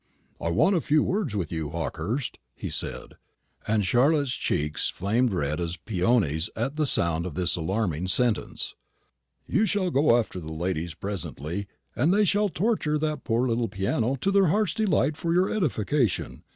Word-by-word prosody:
"I 85 - -1
want 160 - +3
a 170 - +2
few 150 +1 +3
words 185 - -1
with 90 -6 -2
you, 80 -3 -3
Hawkehurst," 85 - -3 0.2
he - - -5
said; - - -5 0.5
and 105 -2 +2
Charlotte's 140 - +3
cheeks 75 - -1
flamed 115 +6 +1
red 75 -4 -1
as 85 +1 -3
peonies 95 - +1
at 130 +6 -2
sound 85 -5 +1
of 85 - -7
this 85 -4 +1
alarming 90 -1 -1
sentence. 120 +3 0 0.7
"You 215 +2 +2
shall 190 -4 0
go 135 -4 +4
after 110 -5 -2
the 80 -2 -7
ladies 85 0 -2
presently, 95 -1 -5 0.3
and 150 +8 +2
they 205 +2 +4
shall 205 +2 +2
torture 175 -5 0
that 150 -2 -2
poor 120 +2 +1
little 115 0 0
piano 110 +6 0
to 195 - +2
their 195 -2 +4
hearts' 200 0 +2
delight 165 -9 +1
for 170 -1 0
your 185 +2 +3
edification. 135 - 0
115 Hz, 165 wpm, -26 LUFS, -, 0.7 s, go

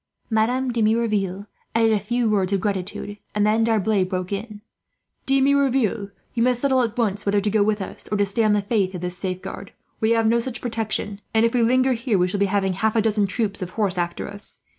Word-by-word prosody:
Madame 245 +4 +1
de 230 - 0
Merouville 215 -3 +1 0.3
added 225 -1 +4
a 215 - +2
few 235 +4 0
words 200 -3 +1
of 195 - +2
gratitude, 205 +1 -3 0.2
and 210 0 +2
then 220 +2 +3
D'Arblay 220 -3 +2
broke 185 0 -3
in 200 +3 -3
with: 210 +1 -19
"De 270 0 +4
Merouville, 265 -7 +2 0.2
you 235 - -1
must 250 0 +2
settle 265 -1 +2
at 235 -1 -2
once 205 -4 0
whether 205 0 +2
to 205 +1 0
go 215 0 +3
with 210 -1 +1
us, - - -9
or 210 - +1
stay 200 +4 0
on 215 -1 +3
the 205 -1 +1
faith 200 -3 0
of 175 - -5
this 180 0 -2
safeguard. 185 0 -5 0.3
We 220 - +1
have 225 -1 +2
no 230 +2 +3
such 245 0 -3
protection 220 -3 -3
and, 220 +1 +5
if 230 - +1
we 245 - +2
linger 255 +3 +3
here, 235 -3 0
we 180 0 +2
shall 195 +2 -3
be 200 - +3
having 195 -1 0
half 220 +4 0
a 225 - +4
dozen 210 -2 +2
troops 200 0 -1
of 180 - -3
horse 200 -1 -1
after 175 0 -2
us. 205 +1 -7
215 Hz, 230 wpm, -23 LUFS, 200-230 Hz, 0.3 s, and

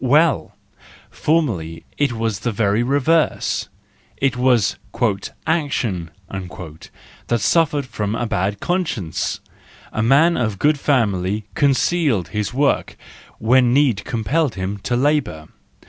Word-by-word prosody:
—Well! 150 +2 +3 0.6
Formerly 95 - -1
it 145 -4 +1
was 110 -3 -2
the 120 - -2
very 105 0 +1
reverse: 145 +5 +1 0.5
it 135 -2 +1
was 125 -4 +2 0.7
"action" 130 - -1 0.2
that 90 +4 -7
suffered 145 +4 +2
from 105 -4 -3
a 120 - -1
bad 100 -1 -1
conscience. 165 - -2 0.5
A 110 - -1
man 145 +9 +4
of 110 -5 -1
good 150 +6 +2
family 105 -7 +1
concealed 140 - +1
his 105 -1 -2
work 140 +3 0 0.4
when 125 +2 +3
need 130 -8 +3
compelled 125 +5 0
him 95 +1 -4
to 120 +5 -2
labour. 125 - 0
120 Hz, 115 wpm, -20 LUFS, 100-145 Hz, 0.7 s, man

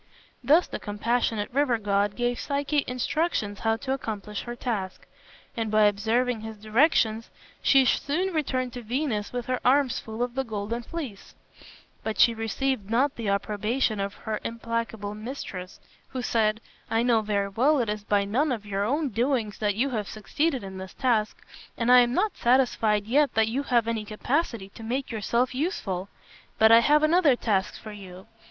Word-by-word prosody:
Thus 320 +5 +5
the - - -6
compassionate 225 +1 -1
river 270 -3 +2
god 205 -1 0
gave 245 0 -1
Psyche 285 0 0
instructions 250 -4 -1
how 225 0 +1
to 265 +3 -2
accomplish 210 -5 -4
her 240 0 -5
task, 210 -7 -4 0.5
and 225 -2 -2
by 215 0 +4
observing 220 +3 +1
his 220 0 -7
directions 220 0 +2 0.3
she 270 -1 +5
soon 350 +9 0
returned 255 -5 -1
to 245 - -6
Venus 235 -2 -2
with 245 -1 -4
her 255 -1 -1
arms 265 0 +3
full 220 +2 -4
of 245 -1 -3
the 270 +1 -1
golden 220 0 -4
fleece; 255 -7 -7 0.7
but 220 -1 -3
she 235 - +6
received 225 0 -2
not 260 +5 +2
the 225 -3 -3
approbation 215 +3 0
of 200 0 -3
her 215 -1 -4
implacable 230 -2 -3
mistress, 210 -5 -7 0.3
who 255 -2 -4
said, 220 -2 +1 0.3
"I 225 +1 +2
know 235 -2 +3
very 200 -2 -1
well 265 +10 +3
it 240 -4 0
is 210 0 -3
by 205 -1 +1
none 260 +9 +1
of 220 -4 -3
your 200 -1 -2
own 285 +7 0
doings 235 -2 -1
that 205 -2 0
you 260 +5 0
have 215 -4 -2
succeeded 265 +5 -1
in 190 -1 -7
this 190 0 -9
task, 230 -5 0 0.3
and 235 0 +2
I 250 - +9
am 240 -1 +3
not 420 +3 +1
satisfied 235 -4 +2
yet 280 +6 +2
that 220 0 +3
you 255 +5 -1
have 240 -5 +1
any 225 -2 -2
capacity 230 - -2
to 210 - -13
make 250 +5 -3
yourself 235 +3 0
useful. 205 - -2 0.5
But 220 0 +6
I 230 - +9
have 295 +5 +4
another 310 -3 +4
task 200 -5 -1
for 215 - -9
you. 190 -2 -11
230 Hz, 175 wpm, -26 LUFS, 210-260 Hz, 0.7 s, I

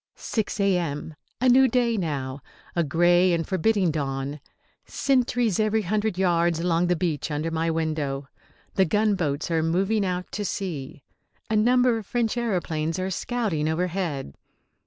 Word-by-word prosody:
6 220 -1 -3
A.M. 170 -6 0 0.3
A 255 - +2
new 260 +2 +6
day 240 -1 +1
now. 140 -7 -3 0.3
A 170 - +2
grey 175 +4 +3
and 165 -1 -1
forbidding 190 -1 +2
dawn. 140 -1 -3 0.4
Sentries 245 -6 +1
every 215 0 +2
hundred 210 +1 -1
yards 170 -3 +2
along 170 0 +1
the 180 - +2
beach 165 -4 -2
under 155 +2 -2
my 165 +1 0
window. 155 -4 -2 0.5
The 190 - +3
gunboats 180 -6 0
are 165 -1 +2
moving 190 +6 +1
out 180 -1 -3
to 210 - -3
sea. 155 -9 -4 0.5
A - - +2
number 245 +2 +3
of 210 - -11
French 235 -2 0
aeroplanes 170 -9 -1
are 185 +1 -2
scouting 190 -8 -1
overhead. 165 - -2
180 Hz, 145 wpm, -25 LUFS, 160-215 Hz, 0.5 s, new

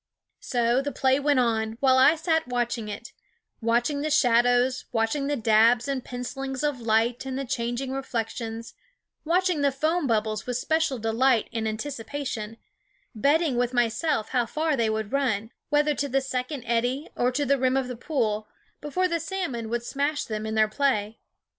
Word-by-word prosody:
So 240 0 +1
the 285 +1 -3
play 265 0 +2
went 285 -1 +2
on, 220 -2 +1
while 260 -1 +4
I 290 +5 +6
sat 320 -2 0
watching 240 -2 -2
it 210 +3 -7 0.5
watching 240 +5 +1
the 310 - -1
shadows, 245 -2 +3
watching 240 +5 0
the 290 - 0
dabs 230 +1 +4
and 270 -2 -2
pencilings 265 +2 -5
of 290 -4 -1
light 230 +2 +1
and 265 -1 -4
the 275 - -3
chan 235 -1 -2
ging 265 +1 -4
reflections, 230 -3 -4 0.5
watching 355 -1 +2
the 280 -1 +3
foam 310 +3 0
bubbles 215 -1 -1
with 250 -1 -1
special 315 0 0
delight 230 +2 +2
and 225 -1 -1
anticipation, 230 -1 -4 0.6
betting 285 +4 +2
with 245 +1 0
myself 240 +1 +1
how 245 -3 +1
far 310 +4 0
they 230 -3 +1
would 220 -1 -2
run, 230 -6 0 0.2
whether 295 0 +3
to 285 0 -2
the 270 +1 +2
second 260 0 -3
eddy 245 +5 0
or 245 +1 +1
to 290 +3 0
the 280 0 +2
rim 260 +1 +2
of 265 -2 0
the 250 - -5
pool, 225 -6 -1 0.3
before 360 +6 0
the 335 -1 -1
salmon 310 -10 -3
would 235 +1 -2
smash 285 +4 -1
them 215 0 -4
in 220 - -3
their 215 0 +4
play. 220 -3 0
250 Hz, 175 wpm, -26 LUFS, 230-285 Hz, 0.6 s, I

